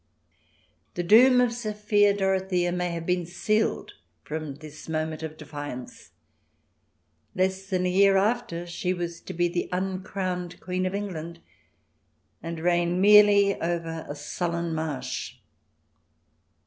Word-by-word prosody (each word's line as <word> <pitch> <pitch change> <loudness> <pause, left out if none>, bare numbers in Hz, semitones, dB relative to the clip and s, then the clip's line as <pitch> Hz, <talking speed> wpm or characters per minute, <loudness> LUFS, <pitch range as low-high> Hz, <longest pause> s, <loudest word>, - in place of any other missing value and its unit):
The 175 - -1
doom 250 +7 +7
of 245 -1 +3
Sophia 210 -3 +2
Dorothea 190 -2 +1
may 180 0 -1
have 170 -1 -4
been 180 -1 0
sealed 215 +5 0 0.3
from 155 -2 -5
this 155 +2 -11
moment 155 0 -2
of 160 -1 -6
defiance. 145 -4 -8 1.3
Less 190 +1 0
than 185 -2 0
a 180 - +1
year 195 +1 +5
after 195 -5 0
she 180 +1 -2
was 170 -1 -5
to - - -8
be 175 +1 +2
the 175 0 -3
uncrowned 185 -1 -3
Queen 185 0 -2
of 185 - -3
England, 170 -5 -5 1.0
and 165 0 -5
reign 175 +1 +1
merely 205 0 +6
over 165 -1 -3
a 145 - -4
sullen 170 +3 -3
marsh. 155 -4 -4
180 Hz, 125 wpm, -26 LUFS, 165-195 Hz, 1.3 s, doom